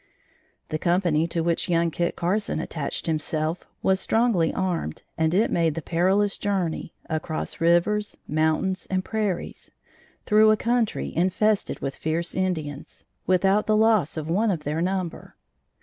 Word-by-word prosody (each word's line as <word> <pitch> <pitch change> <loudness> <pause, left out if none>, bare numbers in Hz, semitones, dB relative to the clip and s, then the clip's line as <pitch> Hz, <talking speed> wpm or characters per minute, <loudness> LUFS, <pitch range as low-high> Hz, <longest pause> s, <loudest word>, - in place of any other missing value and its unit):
The 155 - -2
company 170 -2 +2
to 170 0 -2
which 170 +1 0
young 170 -1 +2
Kit 170 +2 -1
Carson 185 0 -1
attached 155 -3 -4
himself, 155 +1 -2 0.2
was 190 0 +3
strongly 220 -9 +2
armed 175 - -2
and 160 0 +1
it 205 +6 +2
made 165 -3 +1
the 165 - -3
perilous 190 +4 +2
journey, 190 -6 -2
across 160 +1 -4
rivers, 175 +5 +2
mountains 160 +5 0
and 185 0 -1
prairies, 210 -5 -3 0.6
through 215 +1 +5
a 215 - +4
country 235 -1 -1
infested 195 +4 +1
with 135 - -3
fierce 165 +2 -2
Indians, 155 -6 -3 0.2
without 190 +3 +3
the 215 0 +3
loss 215 -8 +3
of 155 -1 -4
one 205 +7 +1
of 170 -6 -1
their 150 +3 -2
number. 185 -1 -3
175 Hz, 145 wpm, -25 LUFS, 160-200 Hz, 0.6 s, through